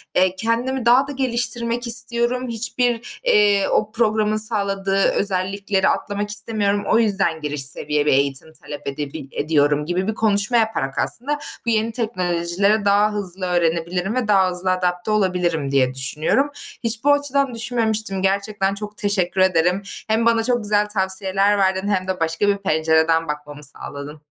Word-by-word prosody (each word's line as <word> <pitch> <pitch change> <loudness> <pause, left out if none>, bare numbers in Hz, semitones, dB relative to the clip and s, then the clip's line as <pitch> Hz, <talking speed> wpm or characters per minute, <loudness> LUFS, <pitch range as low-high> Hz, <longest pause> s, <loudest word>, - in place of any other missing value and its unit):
eee, 185 0 +2
kendimi 235 +4 -1
daha 255 +3 +4
da 285 - -6
geliştirmek 240 -2 -1
istiyorum. 235 +2 -1
Hiçbir, 235 +1 -2
eee, 205 - +3
o 215 0 0
programın 215 -1 +1
sağladığı 200 -3 0
özellikleri 195 0 0
atlamak 205 0 -2
istemiyorum. 205 -1 0
O 230 - +3
yüzden 195 -7 0
giriş 150 -2 0
seviye 150 +1 +1
bir 150 - +3
eğitim 140 +3 +1
talep 145 -1 -9
edebil 140 -1 -5
ediyorum 150 -1 +1
gibi 180 +3 -2
bir 220 - -1
konuşma 215 +2 +1
yaparak 220 - -1
aslında 245 - +1 0.3
bu - - -1
yeni 225 0 +1
teknolojileri 200 -2 0
daha 205 +1 +3
hızlı 190 -2 -2
öğrenebilirim 175 +3 -1
ve 255 -4 -1
daha 195 -3 +4
hızlı 180 +1 -1
adapte 180 +2 -1
olabilirim 180 -8 0
diye 130 -2 +2
düşünüyorum. 155 - 0 0.3
Hiç 230 0 0
bu 290 - +4
açıdan 280 -2 0
düşünmemiştim. 220 -4 -1
Gerçekten 195 0 0
çok 210 +1 -7
teşekkür 190 -2 0
ederim. 180 0 +2 0.3
Hem 220 +1 +1
bana 230 -1 +3
çok 240 -1 +1
güzel 210 0 +2
tavsiyeler 195 0 +2
verdin 190 0 0
hem 185 -2 -1
de 190 -1 -3
başka 165 +5 0
bir 200 - +2
pencereden 160 -2 +1
bakmamı 150 0 -7
sağladın. 145 +1 -7
200 Hz, 155 wpm, -20 LUFS, 175-225 Hz, 0.3 s, daha